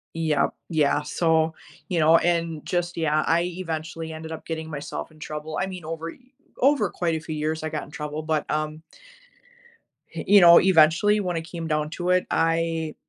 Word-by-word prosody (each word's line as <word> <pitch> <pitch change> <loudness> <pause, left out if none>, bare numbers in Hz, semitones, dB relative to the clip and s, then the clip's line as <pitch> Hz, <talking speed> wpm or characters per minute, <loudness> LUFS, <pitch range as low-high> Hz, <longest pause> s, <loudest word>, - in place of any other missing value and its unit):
Yep. 155 -3 +1 0.2
Yeah, 155 -4 +2
so, 160 -1 +1 0.4
you 175 -3 0
know, 160 +2 +6
and 165 -3 -1
just 175 -1 -2
yeah, 155 -2 +1
I 170 +1 +2
eventually 160 -2 -5
ended 160 0 -8
up 160 - -7
getting 160 -1 -5
myself 145 +1 -6
in 155 - -19
trouble, 155 0 -6
I 190 - -1
mean, 180 -4 -8
over 165 +1 -5
y - - -16 0.4
over 265 -7 +3
quite 170 -2 -1
a - - -2
few 155 0 -6
years, 155 +1 -2
I 155 - -2
got 155 -1 -4
in 145 - -13
trouble, 150 +1 -5
but, 155 -1 -1
um 155 +1 -2 1.3
h - - -5
you 205 -1 +7
know, 170 -1 +9
eventually, 185 +4 +4
when 180 -4 -2
it - - -2
came 165 -1 -6
down 150 -1 -1
to 180 +1 -3
it, 180 0 +3
I, 165 -1 0
160 Hz, 195 wpm, -24 LUFS, 155-170 Hz, 1.3 s, know